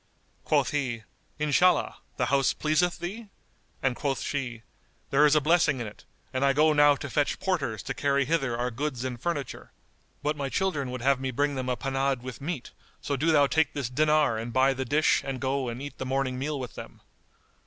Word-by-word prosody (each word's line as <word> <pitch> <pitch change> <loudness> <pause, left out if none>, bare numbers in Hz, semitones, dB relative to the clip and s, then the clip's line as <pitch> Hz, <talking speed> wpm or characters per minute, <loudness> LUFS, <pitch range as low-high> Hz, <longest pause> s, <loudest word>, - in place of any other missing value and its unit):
Quoth - - +2
he, 125 -6 -2 0.3
"Inshallah, 150 +5 +2 0.2
the - - +1
house 135 -1 +2
pleaseth 160 +3 +1
thee?"; 205 +6 -6 0.6
and 130 -2 +1
quoth 140 -1 -1
she, 120 -5 -4 0.5
"There 145 +2 +6
is 150 - +3
a - - +6
blessing 150 -3 +3
in 120 - -3
it; 105 - -11 0.3
and 130 +1 0
I 140 0 +4
go 155 +2 +4
now 145 -1 +6
to 140 - -6
fetch 145 +1 0
porters 140 - -1
to 135 - -3
carry 140 0 +1
hither 135 -5 0
our 125 +1 -1
goods 130 0 -3
and 125 -2 -5
furniture. 145 -7 -4 0.5
But 150 +1 0
my 140 -2 -3
children 150 -7 -1
would 125 -1 -5
have 135 0 +3
me 130 0 -2
bring 145 +3 0
them 130 -1 -3
a 125 - 0
panade 135 -1 -1
with 130 +1 -8
meat; 145 -3 -4 0.3
so 145 - -2
do 160 +5 +2
thou 145 -2 +5
take 155 +1 +1
this 135 -4 -3
dinar 150 -4 +2
and 115 +1 -5
buy 130 +2 +3
the 130 0 -3
dish 150 +5 +3
and 135 -1 -4
go 130 0 -1
and 120 +1 -5
eat 145 +1 -8
the 130 - -3
morning 130 -1 -1
meal 145 +1 -2
with 125 -2 -6
them." - - -10
140 Hz, 205 wpm, -27 LUFS, 130-150 Hz, 0.6 s, There